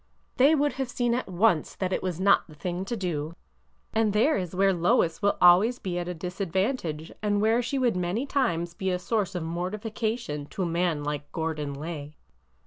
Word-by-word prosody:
They 280 Hz, +5 st, +6 dB
would 290 Hz, 0 st, +1 dB
have 260 Hz, -, -2 dB
seen 240 Hz, -1 st, 0 dB
at 250 Hz, -, -1 dB
once 185 Hz, -3 st, +2 dB
that 185 Hz, -1 st, -2 dB
it -, -, 0 dB
was 180 Hz, -2 st, -3 dB
not 200 Hz, +1 st, +4 dB
the 155 Hz, -, -14 dB
thing 180 Hz, +4 st, -4 dB
to 235 Hz, +4 st, -3 dB
do. 165 Hz, -4 st, -3 dB, 0.6 s
And 220 Hz, -2 st, +2 dB
there 230 Hz, +9 st, +3 dB
is 180 Hz, -2 st, -3 dB
where 195 Hz, +1 st, +4 dB
Lois 170 Hz, -1 st, +2 dB
will 200 Hz, 0 st, +2 dB
always 185 Hz, +8 st, +6 dB
be 180 Hz, -5 st, -3 dB
at 175 Hz, -, -4 dB
a 180 Hz, -, -4 dB
disadvantage, 180 Hz, -, -2 dB
and 205 Hz, -1 st, +1 dB
where 225 Hz, +3 st, +3 dB
she 255 Hz, +3 st, -2 dB
would 245 Hz, -6 st, +2 dB
many 180 Hz, +8 st, -1 dB
times 175 Hz, -13 st, 0 dB
be 190 Hz, +1 st, -2 dB
a 180 Hz, -, +1 dB
source 200 Hz, 0 st, -1 dB
of 175 Hz, -, -2 dB
mortification 205 Hz, -1 st, -3 dB
to 190 Hz, -, -4 dB
a -, -, 0 dB
man 170 Hz, -3 st, 0 dB
like 145 Hz, 0 st, -4 dB
Gordon 155 Hz, -3 st, -3 dB
Lay." 150 Hz, 0 st, -6 dB
185 Hz, 200 wpm, -27 LUFS, 170-220 Hz, 0.6 s, They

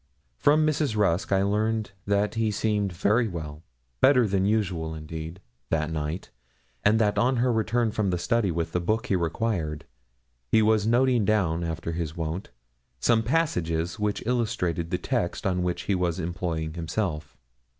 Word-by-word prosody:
From 150 Hz, -, +4 dB
Mrs. 150 Hz, -6 st, 0 dB
Rusk 95 Hz, -4 st, +1 dB
I 95 Hz, 0 st, +3 dB
learned 110 Hz, +1 st, 0 dB, 0.2 s
that 100 Hz, +1 st, +1 dB
he 115 Hz, 0 st, 0 dB
had 105 Hz, -1 st, 0 dB
seemed 105 Hz, -3 st, 0 dB
very 105 Hz, +7 st, +2 dB
well 80 Hz, -5 st, -6 dB, 0.4 s
better 130 Hz, -3 st, +5 dB
than 95 Hz, -1 st, +1 dB
usual, 90 Hz, -7 st, 0 dB
indeed 80 Hz, +2 st, -7 dB, 0.3 s
that 80 Hz, 0 st, 0 dB
night, 75 Hz, +3 st, -4 dB, 0.5 s
and 105 Hz, +2 st, +4 dB
that 105 Hz, -2 st, +2 dB
on 130 Hz, +2 st, +3 dB
her 125 Hz, 0 st, +2 dB
return 115 Hz, +1 st, +1 dB
from 105 Hz, -2 st, 0 dB
the 90 Hz, -, 0 dB
study 105 Hz, +3 st, +1 dB
with 85 Hz, -1 st, -2 dB
the 90 Hz, -, 0 dB
book 110 Hz, +7 st, 0 dB
he 100 Hz, -, +1 dB
required, 85 Hz, -3 st, -1 dB, 0.6 s
he 110 Hz, -, +4 dB
was 110 Hz, -1 st, +3 dB
noting 120 Hz, 0 st, +3 dB
down, 90 Hz, -5 st, +1 dB
after 80 Hz, 0 st, -3 dB
his 80 Hz, -1 st, -4 dB
wont, 80 Hz, +4 st, -3 dB, 0.5 s
some 115 Hz, -, +3 dB
passages 90 Hz, -, 0 dB
which 105 Hz, -1 st, -1 dB
illustrated 110 Hz, -9 st, -1 dB
the 90 Hz, -, 0 dB
text 120 Hz, -8 st, -2 dB
on 90 Hz, -2 st, +1 dB
which 90 Hz, 0 st, -2 dB
he 100 Hz, -, 0 dB
was 90 Hz, -3 st, 0 dB
employing 80 Hz, -2 st, -3 dB
himself. 80 Hz, -4 st, -3 dB
95 Hz, 165 wpm, -26 LUFS, 85-110 Hz, 0.6 s, better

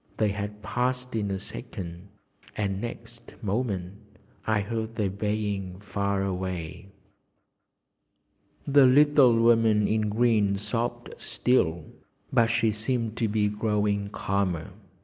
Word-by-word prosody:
They 110 Hz, -1 st, +2 dB
had 105 Hz, +1 st, -5 dB
passed 125 Hz, +1 st, -1 dB
in 105 Hz, -2 st, -1 dB
a 95 Hz, -, -1 dB
second, 85 Hz, 0 st, -8 dB, 0.5 s
and 100 Hz, -2 st, -1 dB
next 115 Hz, 0 st, -8 dB
moment 100 Hz, -3 st, -2 dB, 0.5 s
I 110 Hz, -1 st, +2 dB
heard 110 Hz, +2 st, -4 dB
their 105 Hz, -4 st, 0 dB
baying 100 Hz, -2 st, -2 dB
far 100 Hz, -1 st, -1 dB
away. 95 Hz, -2 st, -4 dB, 1.8 s
The 140 Hz, -2 st, +6 dB
little 140 Hz, -3 st, +6 dB
woman 115 Hz, -2 st, +4 dB
in 110 Hz, -1 st, +1 dB
green 105 Hz, -3 st, +2 dB
sobbed 120 Hz, +3 st, -3 dB
still, 85 Hz, -10 st, +1 dB, 0.5 s
but 120 Hz, -3 st, +5 dB
she 115 Hz, -1 st, +2 dB
seemed 115 Hz, +1 st, -2 dB
to 115 Hz, -, +1 dB
be 105 Hz, 0 st, +1 dB
growing 105 Hz, -1 st, 0 dB
calmer. 95 Hz, -5 st, -2 dB
105 Hz, 115 wpm, -27 LUFS, 100-115 Hz, 1.8 s, The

